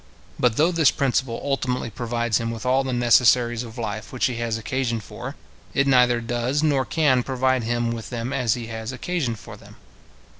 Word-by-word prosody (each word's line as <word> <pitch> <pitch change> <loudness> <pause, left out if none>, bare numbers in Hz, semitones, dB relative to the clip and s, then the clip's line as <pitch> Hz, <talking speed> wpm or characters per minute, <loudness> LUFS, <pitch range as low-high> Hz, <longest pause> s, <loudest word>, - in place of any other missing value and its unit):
But 120 -3 +2
though 165 +4 +4
this 165 -4 +4
principle 130 -3 0
ultimately 130 -4 -1
provides 120 -1 -1
him 115 - -2
with 115 0 -6
all 130 +2 +3
the 130 - -3
necessaries 120 -1 +4
of 115 -1 -9
life 110 -2 -4
which 130 - 0
he 125 -3 -1
has 115 -1 -1
occasion 120 0 -2
for, 105 - -8 0.4
it 140 - +3
neither 125 -3 +4
does 120 +5 -1
nor 140 -4 +2
can 145 -6 +2
provide 130 0 0
him 120 0 0
with 115 -1 -6
them 120 +2 -4
as 125 -5 +1
he 120 -2 -6
has 110 0 -5
occasion 130 -3 -2
for - - -11
them. - - -16
120 Hz, 190 wpm, -23 LUFS, 115-130 Hz, 0.4 s, though